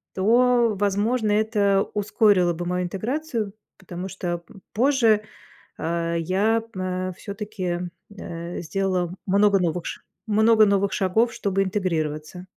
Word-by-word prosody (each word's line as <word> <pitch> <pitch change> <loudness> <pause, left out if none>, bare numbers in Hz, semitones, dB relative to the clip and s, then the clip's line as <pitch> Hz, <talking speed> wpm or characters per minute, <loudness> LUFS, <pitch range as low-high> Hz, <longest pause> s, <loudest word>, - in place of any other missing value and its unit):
То, 235 +3 +3
возможно, 210 +3 +1
это 205 -2 +2
ускорило 205 -3 +3
бы 175 +1 -5
мою 180 +1 -1
интеграцию. 225 - -3 0.2
Потому 180 0 -7
что, 175 -3 -4
м, 195 - -15
позже, 230 -4 +3 0.5
а, 170 +1 -2
я, 200 +7 +1
а, 185 0 -3
всё-таки, 200 -3 -4 0.4
э, 170 +1 -6
сделала 180 0 -1
много 200 +1 +4
новых 175 -1 -1
ш - - -6 0.3
много 220 +1 +5
новых 200 -1 +2
шагов, 220 +5 +1
чтобы 195 -2 -1
интегрироваться. 175 -3 -3
195 Hz, 120 wpm, -24 LUFS, 180-215 Hz, 0.5 s, много